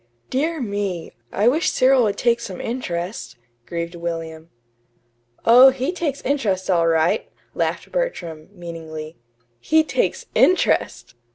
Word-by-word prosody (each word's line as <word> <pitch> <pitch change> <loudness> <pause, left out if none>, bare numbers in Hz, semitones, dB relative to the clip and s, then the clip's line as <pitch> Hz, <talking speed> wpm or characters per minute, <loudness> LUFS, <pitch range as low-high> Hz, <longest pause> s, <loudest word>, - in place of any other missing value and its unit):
"Dear 315 +5 0
me! 200 -7 -3 0.2
I 210 +3 +1
wish 310 +7 +3
Cyril 260 0 +4
would 205 - -1
take 235 -1 +2
some 190 -6 -7
interest," 180 - -4 0.3
grieved 170 0 -4
William. 165 -1 -5 1.0
"Oh, 250 +3 +9
he 265 +4 -2
takes 325 -6 -3
interest 200 -10 0
all 170 -2 +3
right," 165 +1 +1 0.2
laughed - - -2
Bertram, 175 - -3
meaningly. 165 -4 -8 0.4
"He 315 - +3
takes 485 +10 -1
INTEREST!" 370 - +2
200 Hz, 120 wpm, -21 LUFS, 170-265 Hz, 1.0 s, Oh